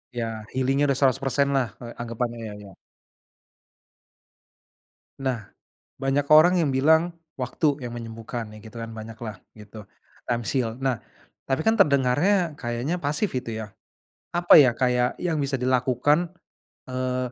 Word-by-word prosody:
Iya, 120 - -1 0.3
healing-nya 135 +2 +1
udah 140 - +1
100% 135 +1 +2
lah, 130 -3 +2 0.2
eee, 120 - -7
anggepannya 120 0 -3
ya 105 - -7
ya? 95 - -12 2.5
Nah, 125 -6 -3 0.5
banyak 135 +1 +1
orang 175 +4 +7
yang 155 -6 +2
bilang 160 +6 +3 0.2
waktu 140 +1 -1
yang 120 - -5
menyembuhkan 115 0 -6
ya - - -11
gitu 115 +1 -9
kan 115 0 -6
banyak 110 0 -8
lah 110 -3 -6 0.2
gitu, 105 0 -12 0.4
times 120 -2 -2
heal. 115 -3 0
Nah 135 -3 +1 0.5
tapi 135 +3 +1
kan 225 +1 +3
terdengarnya 150 +3 +3
kayaknya 120 +8 -2
pasif 150 +8 0
itu 125 -2 -3
ya, 105 -1 -8 0.6
apa 175 0 +5
ya, 135 -5 +7
kayak 125 -1 +1
yang 165 -3 -1
bisa 135 -1 -1
dilakukan, 130 +6 +2 0.6
eee, 130 -1 -2
130 Hz, 140 wpm, -25 LUFS, 120-145 Hz, 2.5 s, orang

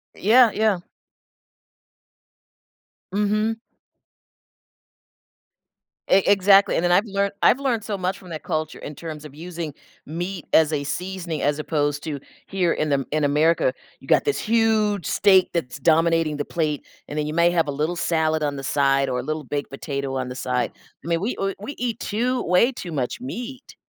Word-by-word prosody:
Yeah, 230 +3 +5
yeah. 215 -4 +2 2.3
Mhm. 215 +2 +1 2.5
E 190 0 +5
exactly, 195 0 +5
and - - +1
then 175 - +2
I've 195 +5 +4
lear 200 -1 -1
I've 250 - +5
learned 250 -6 0
so 205 -2 -3
much 185 +1 -2
from 185 - -14
that 155 -2 -6
culture 155 0 -3
in 150 - -8
terms 155 -2 -7
of 145 -2 -11
using 165 -2 -6 0.3
meat 175 +3 -5
as 160 -1 +5
a 145 - -1
seasoning 175 +1 -4
as 145 +1 +1
opposed 150 -1 -1
to 150 -3 -4 0.3
here 185 -3 +1
in 155 -1 -1
Am 135 -1 +1
in 155 -1 0
America, 150 0 +3 0.3
you - - -16
got - - +4
this 430 - 0
huge 215 -4 +2
steak 190 -3 +4
that's 135 -6 -3
dominating 165 0 +2
the 145 - -2
plate, 155 -4 -2 0.2
and 150 - -6
then 150 - -1
you 150 - -3
may 170 +1 +4
have 165 -3 +1
a - - -1
little 155 +5 -1
salad 160 -2 +1
on 145 -1 -1
the 135 - -6
side 135 -1 +2
or 125 -1 -1
a 125 - -4
little 155 +1 -3
baked 145 +2 -4
potato 140 -1 -4
on 130 -1 -2
the 125 - -6
side. 125 -1 -1 0.3
I - - -7
mean, 170 0 0
we 220 +6 -1
w 195 0 -2
we 265 +8 -6
eat 240 -2 -2
too 245 +5 -1
way 180 +9 +3
too 180 -9 -7
much 135 - -3
meat. 255 +1 -7
170 Hz, 180 wpm, -23 LUFS, 150-200 Hz, 2.5 s, Yeah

